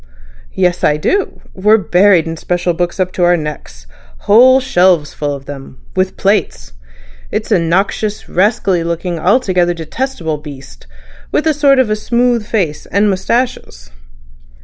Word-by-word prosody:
"Yes; 180 -1 0
I 150 - +2
do. 390 - -2
We're 210 +3 +3
buried 185 -1 +3
in 165 0 -4
special 175 +1 -2
books 175 +2 -3
up 185 -1 0
to 180 - -2
our 175 0 +4
necks—whole 155 - +1
shelves 180 - +2
full 145 -1 -3
of 135 -1 -11
them—with 145 +7 -5
plates.... 190 - -1 0.6
It's - - -4
a - - +4
noxious, 195 +5 -1
rascally 190 -2 +1
looking, 170 +1 -3
altogether 180 -3 +1
detestable 165 - -4
beast, 135 - -12 0.4
with 305 - 0
a 315 - +3
sort 280 -2 +3
of 225 -5 +2
smooth 240 0 0
face 170 -10 -2
and 205 +2 +1
moustaches." 190 - -3
180 Hz, 135 wpm, -14 LUFS, 160-215 Hz, 0.6 s, our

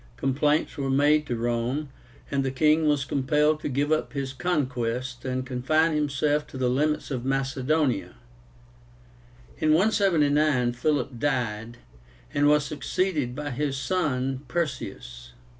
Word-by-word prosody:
Complaints 145 +5 +1
were 135 -1 -2
made 145 +2 +3
to 120 - -1
Rome, 120 +5 -1 0.4
and 140 -1 +1
the 135 - 0
king 155 +3 +3
was 145 -2 +2
compelled 150 +3 +1
to 155 - -4
give 145 +3 0
up 155 - 0
his 135 -2 -3
conquests, 130 -6 -2
and 130 0 -2
confine 155 +6 +1
himself 150 0 0
to - - -9
the 125 -1 +1
limits 150 +3 0
of 125 -3 -3
Macedonia. 135 - 0 1.4
In 155 0 +3
179 155 - +3
Philip 125 -1 -1
died, 120 -5 -2 0.6
and 145 0 +3
was 150 0 +4
succeeded 145 -2 -1
by 145 0 -4
his 140 +1 -2
son 135 -5 -1
PERSEUS. 60 - -4
140 Hz, 130 wpm, -26 LUFS, 125-150 Hz, 1.4 s, was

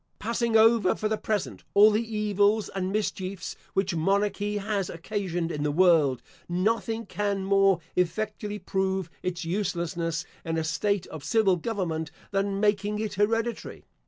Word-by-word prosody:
Passing 230 +1 +1
over, 220 -3 +5
for 215 - -1
the 220 - 0
present, 210 -3 -2
all 210 +2 +8
the 210 +2 +2 0.2
evils 210 0 +2
and 190 -1 -3
mischiefs 195 -3 -3 0.2
which 190 -1 +1
monarchy 200 +4 0
has 200 -2 -2
occasioned 175 -1 -3
in 150 - -3
the 150 - +1
world, 155 -6 +4 0.3
nothing 225 +5 0
can 200 -2 -2
more 195 -2 +4 0.2
effectually 210 +3 -1
prove 190 -3 -1
its 180 -2 -3
uselessness 170 -3 -2 0.2
in 165 -1 -2
a 160 - 0
state 195 +5 0
of 155 -3 -8
civil 215 -5 +3
government, 165 -5 -3 0.2
than 195 0 0
making 205 0 +1
it 215 -1 -3
hereditary. 225 +3 -1
195 Hz, 145 wpm, -27 LUFS, 175-210 Hz, 0.3 s, all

